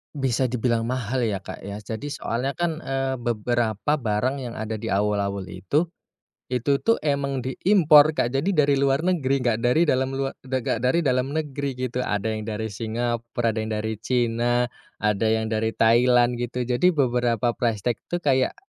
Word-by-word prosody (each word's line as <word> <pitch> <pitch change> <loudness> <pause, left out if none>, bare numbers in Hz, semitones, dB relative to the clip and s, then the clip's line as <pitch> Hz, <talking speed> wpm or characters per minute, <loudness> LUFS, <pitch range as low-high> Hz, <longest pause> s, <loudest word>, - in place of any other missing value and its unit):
Bisa 130 -2 0
dibilang 115 -1 0
mahal 130 0 -1
ya 105 -4 0
Kak 95 - -9
ya. 100 +1 -6
Jadi 110 +7 -6
soalnya 135 -1 -3
kan 170 -2 -1
eee, 135 0 -1
beberapa 120 +2 0
barang 130 +1 -1
yang 120 -2 -6
ada 110 0 -4
di 110 +1 -4
awul-awul 100 -1 0
itu, 95 - -1 0.6
itu 130 +3 0
tuh 230 - +3
emang 140 -3 -1
di 130 - -2 0.2
import, 155 -6 +6
Kak. 120 - 0
Jadi 160 +7 0
dari 140 -2 +3
luar 140 +3 +2
negeri, 140 -8 +1
enggak 115 -2 +1
dari 125 +8 +3
dalam 130 -3 +1
lua 135 0 -1
enggak 130 -3 -2
dari 140 +7 +2
dalam 130 +3 0
negeri 140 -3 -3
gitu. 125 0 -2
Ada 110 -2 -1
yang 110 0 -5
dari 110 0 -3
Singapura, 115 +1 -2
ada 110 - -2
yang 110 0 -3
dari 110 +1 -2
China, 120 0 +1 0.3
ada 105 0 0
yang 110 0 0
dari 110 0 +1
Thailand 120 +1 +4
gitu. 125 +1 -2
Jadi 125 +8 +2
beberapa 120 -3 +1
price 115 -4 -2
tag 120 -3 0
tuh 175 - -1
kayak 130 - +2
120 Hz, 175 wpm, -24 LUFS, 110-135 Hz, 0.6 s, import